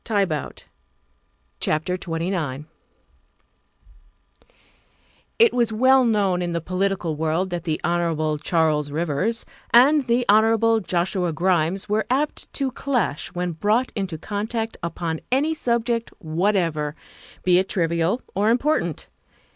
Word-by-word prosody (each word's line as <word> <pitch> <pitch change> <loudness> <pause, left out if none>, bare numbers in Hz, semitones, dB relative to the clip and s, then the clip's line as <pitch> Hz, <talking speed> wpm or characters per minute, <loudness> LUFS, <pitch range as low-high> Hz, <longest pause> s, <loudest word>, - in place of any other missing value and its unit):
THE 220 -3 -1
SECRETARY 180 -7 +1
OF - - -9 1.1
STATE 155 +1 0
279 165 -5 -3
XXIX 155 - -35 0.9
IT 460 -1 +5
was 235 -2 +1
well 260 +4 +4
known 200 -5 +1
in 175 -1 -2
the 170 - 0
political 185 -1 -1
world 160 +4 -1
that 175 -1 -4
the 155 -2 -1
Hon. 165 -2 0
Charles 155 -3 +1
Rivers 170 +9 -1 0.2
and 270 +3 +5
the 240 +1 +2
Hon. 225 +2 +4
Joshua 180 -1 -1
Grimes 175 +3 0
were 215 +1 0
apt 280 +4 -1
to 275 -2 -1
clash 245 - -1
when 180 0 -1
brought 210 +9 0
into 190 -6 -3
contact 220 +5 -3
upon 170 -1 -3
any 290 +5 +2
subject 235 -4 -1
whatever, 165 -3 0 0.5
be 180 -1 +4
it 190 - -2
trivial 170 +4 0
or 205 +3 +2
important. 240 - 0
185 Hz, 125 wpm, -23 LUFS, 165-230 Hz, 1.1 s, IT